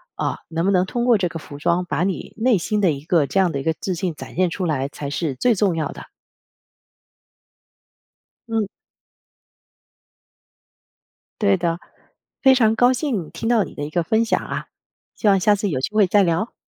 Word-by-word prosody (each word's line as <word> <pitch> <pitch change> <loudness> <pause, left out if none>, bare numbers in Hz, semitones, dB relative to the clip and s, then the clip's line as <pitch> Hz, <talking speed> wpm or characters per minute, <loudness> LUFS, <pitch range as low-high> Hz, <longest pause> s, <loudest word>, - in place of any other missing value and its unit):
啊， - - -2
能 165 +1 -1
不 195 - +3
能 185 -1 +3
通 240 +5 -2
过 240 -3 +5
这 185 -3 -1
个 165 - -6
服 150 -2 -10
装 170 +4 +1
把 175 - -1
你 190 -1 -3
内 235 -1 +3
心 210 +4 -1
的 185 -5 +4
一 140 -1 -5
个 160 -3 +2
这 195 - 0
样 185 -3 +3
的 140 - -3
一 - - -5
个 160 - +1
自 190 - -2
信 175 -1 -3
展 - - -10
现 185 0 +2
出 185 +2 -3
来 140 -5 0
才 140 0 -6
是 145 -1 -2
最 235 - +2
重 195 -4 +1
要 160 -2 -2
的。 - - -9 2.4
嗯。 225 -2 0 2.7
对 200 -2 +4
的， 170 -1 -1 0.6
非 265 -1 +7
常 225 -4 +3
高 245 +2 +4
兴 240 - -2
听 225 - -3
到 230 -4 +4
你 - - -9
的 - - -8
一 145 - -4
个 170 +2 0
分 220 +7 +2
享 225 - +1
啊， - - -5 0.5
希 220 - -1
望 195 -1 +5
下 205 +3 +4
次 205 0 -2
有 140 -7 -1
机 130 - -1
会 210 -2 +6
再 200 +3 +4
聊。 175 +5 0
185 Hz, 210 characters per minute, -21 LUFS, 165-215 Hz, 2.7 s, 非